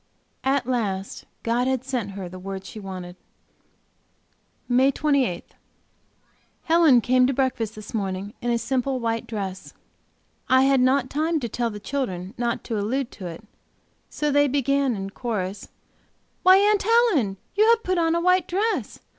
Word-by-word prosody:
At 270 -1 +1
last 205 -6 -3 0.2
God 240 +2 +1
had 260 -1 0
sent 245 -7 -3
her 190 -2 -6
the 185 +1 -9
word 190 0 -6
she 215 - -9
wanted. 185 -3 -7 1.5
MAY 255 +2 +4
28. 275 - 0 1.1
Helen 320 -7 +5
came 255 +2 +3
to 270 - 0
breakfast 245 -5 -1
this 215 0 -10
morning 195 -1 -3
in 240 - -2
a 235 - +2
simple 260 +2 -1
white 230 -1 -2
dress. 195 -4 -5 0.8
I 260 0 +5
had 270 -1 +4
not 260 0 +2
time 315 +2 0
to 240 - -2
tell 235 +1 -2
the 210 -1 -7
children 205 -7 -4
not 235 -1 -2
to 225 -3 -3
allude 245 +5 -2
to 190 -4 -8
it, 170 +5 -8 0.7
so 300 -1 -1
they 290 +1 +4
began 275 -1 +1
in 195 0 -5
chorus: 205 -5 -4 0.7
"Why, 370 +1 +7
Aunt 410 +1 +3
Helen! 410 - +2 0.2
you 430 +3 +4
have 465 0 +4
put 370 -1 0
on 330 0 +2
a - - +2
white 365 0 +3
dress!" 425 +5 -1
250 Hz, 160 wpm, -24 LUFS, 205-280 Hz, 1.5 s, Why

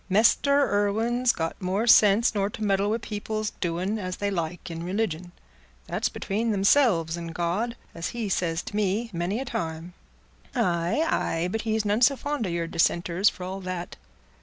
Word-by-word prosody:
Mester 280 +8 +4
Irwine's 225 +5 +2
got 165 -5 -4
more 190 +4 0
sense 220 0 +6
nor 200 -1 0
to 215 - -6
meddle 200 0 +2
wi' 220 - +1
people's 215 -1 -4
doing 180 +5 -1
as 185 -2 -4
they 205 0 -1
like 170 -1 -4
in 165 0 -5
religion. 180 -2 -2 0.5
That's - - -1
between 220 +4 -2
themselves 195 - +3
and 165 -1 -7
God, 185 +8 -1 0.2
as 170 +1 -4
he's 220 -5 -2
said 165 -2 -1
to - - -7
me 210 +3 0
many 175 +6 -1
a 270 - -3
time." 165 -4 -4 0.6
"Aye, 175 - +1
aye; 165 - 0
but 225 - -1
he's 220 -1 -1
none 210 +3 +1
so 275 +3 +5
fond 285 -4 -2
o' - - -3
your 170 -1 -1
dissenters, 170 +3 +2
for 185 - -9
all 190 +2 -5
that." 185 -1 -5
195 Hz, 175 wpm, -26 LUFS, 175-220 Hz, 0.6 s, sense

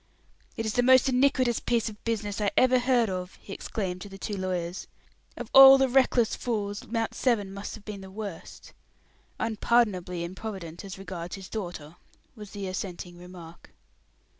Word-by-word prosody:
"It 225 - -2
is 220 - -1
the 245 - +3
most 260 +2 +5
iniquitous 255 -2 +2
piece 235 -2 0
of 210 -1 -8
business 215 -2 -2
I 205 - +2
ever 255 0 +5
heard 245 -2 +2
of!" 185 -1 -5
he 195 - -9
exclaimed 185 -4 -4
to 205 - -8
the 195 - -10
two 205 +1 -4
lawyers. 180 -2 -3 0.5
"Of 240 -2 -7
all 270 0 +11
the 270 0 +3
reckless 250 -3 +3
fools, 205 -4 -3
Mount 225 -1 -2
Severn 210 -7 0
must 200 +1 -6
have 215 - -15
been 210 -2 -7
the 190 - -10
worst!" 200 -3 -8 0.7
"Unpardonably 210 -6 +1
improvident 180 -2 -7
as 195 -1 -8
regards 175 -3 -6
his 195 -1 -10
daughter," 175 -6 -6 0.4
was 210 -3 -10
the 200 -1 -6
assenting 180 -2 -6
remark. 175 -2 -13
205 Hz, 165 wpm, -27 LUFS, 185-235 Hz, 0.7 s, all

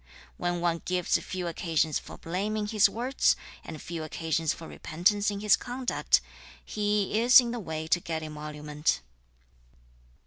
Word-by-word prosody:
When 175 -1 -1
one 170 -1 0
gives 180 -1 +1
few 185 -1 -5
occasions 160 -2 0
for - - -11
blame 195 +6 -2
in 210 - -1
his 210 -1 +4
words, 250 +4 +2 0.3
and 160 -2 -8
few 165 +1 -6
occasions 160 0 -1
for 165 - -7
repentance 200 +6 +1
in 200 -1 -4
his 210 -2 +6
conduct, 250 +1 0 0.4
he 210 0 0
is 245 +2 +9
in 240 -2 0
the 240 - -3
way 160 -5 -4
to 175 - +4
get 160 -2 -4
emolument.' 150 - -2
175 Hz, 150 wpm, -28 LUFS, 160-210 Hz, 0.4 s, is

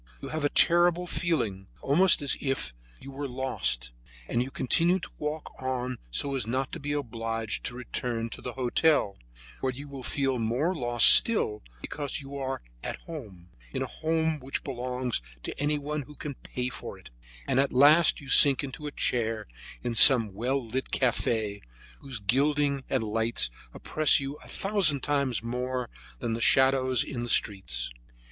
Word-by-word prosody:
You - - -7
have 155 -1 -3
a 145 - +2
terrible 175 +2 +3
feeling, 120 - -2
almost 165 +3 +4
as 140 - +2
if 135 - -2 0.3
you 135 - -10
were 140 +1 -5
lost, 125 - -3 0.4
and 120 - 0
you 125 - -3
continue 170 +8 +2
to - - -8
walk 150 +1 -5
on 130 -1 -3
so 140 - 0
as 130 -5 -1
not 130 +3 -2
to - - -6
be 145 +1 -4
obliged 115 -5 -3
to 120 - -4
return 120 -1 -3
to - - -8
the 125 - -5
hotel, 130 -3 +1 0.4
where 130 - -1
you 140 +3 -9
would 135 -3 -7
feel 135 -3 0
more 125 +11 0
lost 120 -7 +3
still 110 - +3 0.2
because 145 -3 -4
you 140 0 -9
are 135 - -4 0.2
at - - -4
home, 105 - -10 0.3
in - - -1
a - - -2
home 160 -1 -1
which 135 +1 -2
belongs 125 - -2 0.2
to - - -5
anyone 150 0 -1
who 150 +2 -13
can 145 -1 -6
pay 125 -1 -5
for - - -8
it; - - -16 0.4
and 130 - +1
at 140 - +2
last 150 +6 +5
you 140 - -12
sink 135 0 +6
into 140 +2 -6
a - - -5
chair 115 -5 -1 0.4
of 120 -2 +1
some 115 -7 +8
well 125 +5 -2
lighted 130 +4 -4
cafe, 110 -4 0 0.4
whose 135 -3 -5
gilding 140 +6 +1
and 130 -4 0
lights 110 - +1 0.2
oppress 155 - +3
you 140 +1 -5
a - - -15
thousand 190 -9 0
times 140 -5 0
more 125 +1 -3 0.3
than 120 -4 -3
the 115 - -3
shadows 130 0 +4
in 125 -4 -5
the 120 - -4
streets. 75 - +1
130 Hz, 170 wpm, -27 LUFS, 120-145 Hz, 0.4 s, some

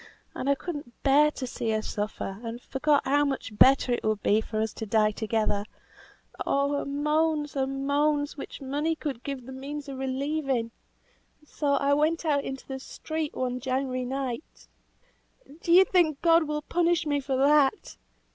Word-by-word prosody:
And 270 - -3
I 280 - +4
could 340 +2 -5
not 240 -5 -13
bear 290 +2 +5
to 275 -3 -5
see 235 -2 -3
her 220 0 0
suffer, 205 -2 -4
and 230 0 -6
forgot 285 +3 +1
how 285 +2 +3
much 270 -6 -3
better 265 +3 +5
it 240 - 0
would 215 -1 -1
be 215 +2 +3
for 220 0 -4
us 220 0 -1
to 220 - -6
die 215 0 +3
together; 215 -1 -1 0.8
oh 280 +1 +1
her 285 - -1
moans, 300 +1 0
her 270 -1 0
moans, 285 +2 0
which 280 - -8
money 295 +4 -1
would 270 -5 -3
give 275 -1 -5
me - - -17
the 265 - -9
means 280 +2 -6
of 270 -1 -6
relieving! 265 -2 -1 0.7
So 290 -1 0
I 280 0 +2
went 315 +3 +1
out 285 -3 +2
into 270 0 -6
the 265 -1 -5
street, 315 +2 -5
one 250 -1 -2
January 255 0 -1
night 265 +1 -5 1.0
Do 335 - -1
you 370 +2 +8
think 325 -7 +2
God 335 -1 +5
will 300 0 -3
punish 340 -1 +1
me 290 -1 +1
for 270 -1 -2
that?" 285 +6 +3
275 Hz, 180 wpm, -27 LUFS, 255-300 Hz, 1.0 s, you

